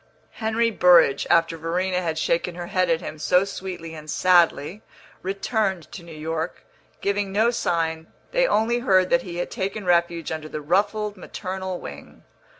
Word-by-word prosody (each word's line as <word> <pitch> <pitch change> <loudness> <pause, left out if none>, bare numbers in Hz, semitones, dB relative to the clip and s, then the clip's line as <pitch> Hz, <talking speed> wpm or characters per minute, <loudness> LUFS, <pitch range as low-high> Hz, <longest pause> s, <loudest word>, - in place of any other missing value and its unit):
Henry 230 +1 0
Burrage, 170 -8 +5
after 165 -1 +3
Verena 180 +3 -1
had 165 -3 -2
shaken 170 +2 0
her 175 0 -5
head 185 0 0
at 165 -1 +2
him 155 - -7
so 180 +4 +3
sweetly 185 -4 -6
and 155 -1 -10
sadly, 175 +1 +3 0.4
returned 195 -2 -2
to 185 - -8
New 170 -1 -13
York, 160 +2 -4 0.4
giving 200 0 -1
no 220 +4 +3
sign; 165 -6 -1 0.2
they - - +3
only 235 - +2
heard 185 -6 +3
that 255 - +4
he 175 -6 -7
had 175 - -3
taken 195 +1 -3
refuge 170 -2 +1
under 155 -1 -5
the 155 - -5
ruffled 205 +6 0
maternal 185 0 -5
wing. 70 0 -11
180 Hz, 160 wpm, -24 LUFS, 165-195 Hz, 0.4 s, Burrage